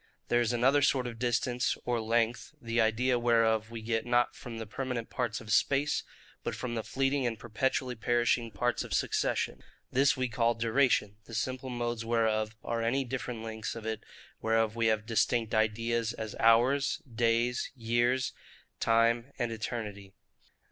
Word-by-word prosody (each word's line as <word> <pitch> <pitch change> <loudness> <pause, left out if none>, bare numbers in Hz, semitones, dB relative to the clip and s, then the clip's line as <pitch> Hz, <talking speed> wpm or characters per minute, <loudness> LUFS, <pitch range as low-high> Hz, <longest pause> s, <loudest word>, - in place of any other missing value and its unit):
There 120 - +3
is 120 0 +1
another 130 +4 +3
sort 135 -2 +2
of 115 -2 -6
distance, 120 0 0
or 120 -2 0
length, 115 +1 0
the 115 0 0
idea 120 +3 +2
whereof 115 -2 +2
we 115 -1 -7
get 115 0 0
not 120 0 +2
from 115 -2 -8
the 115 - -5
permanent 125 +1 -4
parts 120 -5 -2
of 110 -1 -8
space, 140 +6 +2 0.4
but - - -3
from 125 -2 -4
the 115 - -1
fleeting 135 +2 0
and 115 -2 -3
perpetually 125 +3 -1
perishing 120 0 +1
parts 120 +3 -1
of - - -3
succession. - - 0 0.3
This 135 +2 +3
we 130 0 0
call 115 0 +1
DURATION; 115 -3 +2
the 115 - -8
simple 130 +3 -2
modes 120 -2 -2
whereof 110 -1 +1
are 115 0 -2
any 130 +4 +1
different 125 -2 -4
lengths 110 0 -5
of 115 -1 -8
it 110 -1 -3 0.4
whereof 115 0 +1
we 115 -1 +2
have 110 -1 +1
distinct 115 0 +1
ideas, 115 +1 +1
as 110 -1 -6
HOURS, 120 +5 +3
DAYS, 120 0 +1
YEARS, 120 +2 +1
&c., - - -18 0.5
TIME 115 +2 +2
and 120 -1 -1
ETERNITY. 105 -4 -5
115 Hz, 165 wpm, -30 LUFS, 110-125 Hz, 0.5 s, There